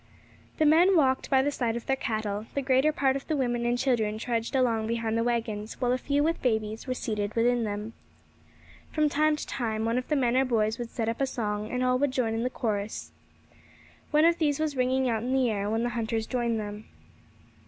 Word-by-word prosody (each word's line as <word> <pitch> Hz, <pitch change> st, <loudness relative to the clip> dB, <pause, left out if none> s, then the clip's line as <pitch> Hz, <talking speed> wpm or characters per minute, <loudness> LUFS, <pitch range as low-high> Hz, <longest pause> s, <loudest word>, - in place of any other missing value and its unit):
The 310 Hz, -, +3 dB
men 340 Hz, +5 st, +5 dB
walked 265 Hz, -4 st, +2 dB
by 265 Hz, -1 st, +4 dB
the 290 Hz, -, 0 dB
side 235 Hz, -5 st, -1 dB
of 235 Hz, -, -5 dB
their 270 Hz, -, +1 dB
cattle; 215 Hz, -4 st, -3 dB
the 280 Hz, -, 0 dB
greater 265 Hz, +3 st, +3 dB
part 270 Hz, -3 st, +1 dB
of 275 Hz, -, -5 dB
the 310 Hz, -, 0 dB
women 240 Hz, -2 st, 0 dB
and 240 Hz, 0 st, +1 dB
children 235 Hz, -5 st, 0 dB
trudged 230 Hz, +1 st, -2 dB
along 230 Hz, -4 st, +1 dB
behind 225 Hz, -1 st, -1 dB
the 230 Hz, -, +1 dB
waggons, 225 Hz, -3 st, -2 dB
while 245 Hz, -1 st, +1 dB
a 255 Hz, -, +1 dB
few 285 Hz, +2 st, +1 dB
with 330 Hz, +2 st, 0 dB
babies 220 Hz, -1 st, -1 dB
were 255 Hz, -, -1 dB
seated 210 Hz, -4 st, -3 dB
within 235 Hz, 0 st, +2 dB
them. 210 Hz, +2 st, -4 dB, 1.0 s
From 305 Hz, -1 st, +2 dB
time 305 Hz, +1 st, +2 dB
to 300 Hz, -, -6 dB
time 220 Hz, -3 st, -2 dB
one 230 Hz, +2 st, +1 dB
of 250 Hz, -, -7 dB
the 300 Hz, -, +1 dB
men 250 Hz, -3 st, +2 dB
or 260 Hz, -, +4 dB
boys 225 Hz, -3 st, 0 dB
would 240 Hz, -1 st, -4 dB
set 225 Hz, -2 st, -3 dB
up 230 Hz, +3 st, -2 dB
a 270 Hz, -, +2 dB
song, 210 Hz, -4 st, -3 dB
and 250 Hz, 0 st, -1 dB
all 255 Hz, 0 st, +2 dB
would 285 Hz, +1 st, +2 dB
join 250 Hz, -4 st, -1 dB
in 225 Hz, -, -1 dB
the 250 Hz, -, 0 dB
chorus. 215 Hz, -4 st, -3 dB, 1.0 s
One 305 Hz, +1 st, +4 dB
of 335 Hz, 0 st, +3 dB
these 295 Hz, -3 st, +1 dB
was 310 Hz, -2 st, -1 dB
ringing 260 Hz, +1 st, +1 dB
out 225 Hz, -3 st, 0 dB
in 250 Hz, +3 st, -2 dB
the 260 Hz, -3 st, +2 dB
air 200 Hz, -1 st, -2 dB
when 225 Hz, +2 st, 0 dB
the 240 Hz, -, 0 dB
hunters 225 Hz, -1 st, -2 dB
joined 235 Hz, -2 st, -1 dB
them. 210 Hz, 0 st, -6 dB
240 Hz, 225 wpm, -27 LUFS, 220-265 Hz, 1.0 s, men